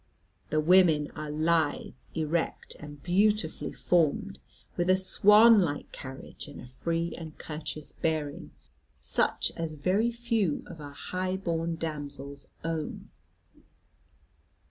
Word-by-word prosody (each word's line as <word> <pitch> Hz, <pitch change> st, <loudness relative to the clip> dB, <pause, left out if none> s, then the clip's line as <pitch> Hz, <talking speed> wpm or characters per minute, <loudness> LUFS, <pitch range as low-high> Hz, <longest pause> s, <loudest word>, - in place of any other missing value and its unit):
The 155 Hz, -, +1 dB
women 160 Hz, -3 st, +5 dB
are 155 Hz, -1 st, -6 dB
lithe, 155 Hz, 0 st, +1 dB, 0.2 s
erect, 160 Hz, +1 st, -1 dB
and 145 Hz, -1 st, -10 dB
beautifully 200 Hz, -1 st, +1 dB
formed, 180 Hz, +4 st, +1 dB, 0.4 s
with 175 Hz, +1 st, 0 dB
a 185 Hz, -, +6 dB
swan 210 Hz, +3 st, +7 dB
like 145 Hz, -5 st, -2 dB
carriage, 130 Hz, +2 st, -8 dB
and 145 Hz, -, -10 dB
a -, -, -9 dB
free 165 Hz, +7 st, -2 dB
and 160 Hz, -2 st, -9 dB
courteous 150 Hz, -1 st, -6 dB
bearing, 155 Hz, -3 st, -2 dB, 0.5 s
such -, -, 0 dB
as 165 Hz, -2 st, -4 dB
very 190 Hz, +10 st, +2 dB
few 230 Hz, -, 0 dB
of 160 Hz, -, -10 dB
our 145 Hz, -1 st, -8 dB
high 185 Hz, +5 st, -3 dB
born 170 Hz, -3 st, -1 dB
damsels 145 Hz, -3 st, -6 dB, 0.2 s
own. 165 Hz, -2 st, -4 dB
165 Hz, 120 wpm, -29 LUFS, 150-185 Hz, 0.5 s, swan